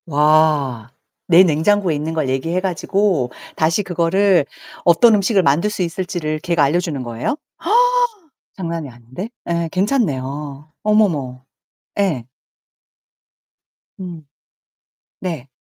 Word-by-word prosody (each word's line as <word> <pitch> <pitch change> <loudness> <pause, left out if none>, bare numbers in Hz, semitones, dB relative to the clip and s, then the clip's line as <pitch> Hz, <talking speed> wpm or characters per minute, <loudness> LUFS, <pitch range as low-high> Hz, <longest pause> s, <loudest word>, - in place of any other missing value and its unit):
와, 150 -6 +2 0.4
내 175 +1 +7
냉장고에 180 +3 +2
있는 155 +2 -3
걸 155 -4 -1
얘기해 165 +7 -1
가지고 185 -6 0 0.2
다시 165 +6 +1
그거를 180 -1 +2 0.4
어떤 215 +7 +6
음식을 200 -1 +2
만들 165 +7 +2
수 210 - -4
있을지를 170 -3 -3
걔가 170 -2 +1
알려주는 150 -2 0
거예요? 120 - -3 1.2
장난이 165 -5 -4
아닌데? 125 - -8 0.2
예, 170 -1 -1
괜찮네요. 150 - -2
어머머. 160 -13 +1 0.6
예. 160 -12 0 1.7
음. 175 -5 -8 0.9
네. 165 -8 -5
165 Hz, 225 characters per minute, -19 LUFS, 145-185 Hz, 1.7 s, 내